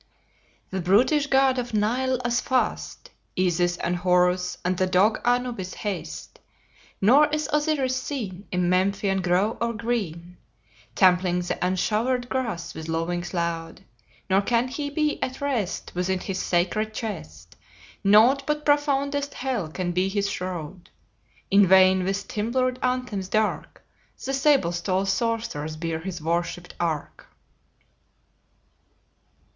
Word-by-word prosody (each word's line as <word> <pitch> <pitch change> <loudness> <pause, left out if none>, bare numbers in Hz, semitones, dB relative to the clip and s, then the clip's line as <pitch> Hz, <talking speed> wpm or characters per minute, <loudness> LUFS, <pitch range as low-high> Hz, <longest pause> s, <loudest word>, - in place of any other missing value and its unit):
"The 190 -1 -2
brutish 250 - +3
god 265 -2 +3
of 240 -2 -4
Nile 250 +5 +1
as 240 0 +1
fast, 260 -1 -2 0.3
Isis 175 -1 +1
and 175 +2 -1
Horus 180 0 +2
and 185 +1 +1
the 185 +1 +1
dog 190 +4 +3
Anubis 245 -6 -1
haste. 205 -4 -6 0.6
Nor 270 +9 +6
is 305 0 -2
Osiris 290 -4 +1
seen 210 -10 -5
In 180 -1 +1
Memphian 195 +1 +1
grove 185 +5 +1
or 235 0 0
green 195 -7 -3 0.6
Trampling 180 -1 +3
the 175 - -2
unshowered 225 +7 0
grass 230 -10 -3
with 160 0 -7
lowings 170 +2 -2
loud; 170 -2 -3 0.4
Nor 190 +1 +3
can 235 +4 +1
he 285 +2 -4
be 300 +1 -1
at 260 +1 -3
rest 245 -10 -2
Within 185 +1 -1
his 190 0 -4
sacred 200 +5 0
chest; 85 - -7 0.5
Nought 235 +8 +5
but 300 0 -1
profoundest 285 -1 +1
hell 250 -10 -2
can 175 +3 -3
be 185 +2 +1
his 200 0 0
shroud. 180 -1 -6 0.6
In 200 0 +6
vain 185 0 +6
with 195 +2 -2
timbrel'd 255 +4 -1
anthems 250 -7 -1
dark 215 +1 -1 0.4
The 270 - -2
sable 270 - +3
stole 185 +2 -1
sorcerers 195 -7 -2
bear 165 0 -3
his 175 -1 -6
worshipped 170 +1 -2
ark." 160 -4 -3
195 Hz, 130 wpm, -25 LUFS, 180-250 Hz, 0.6 s, Nor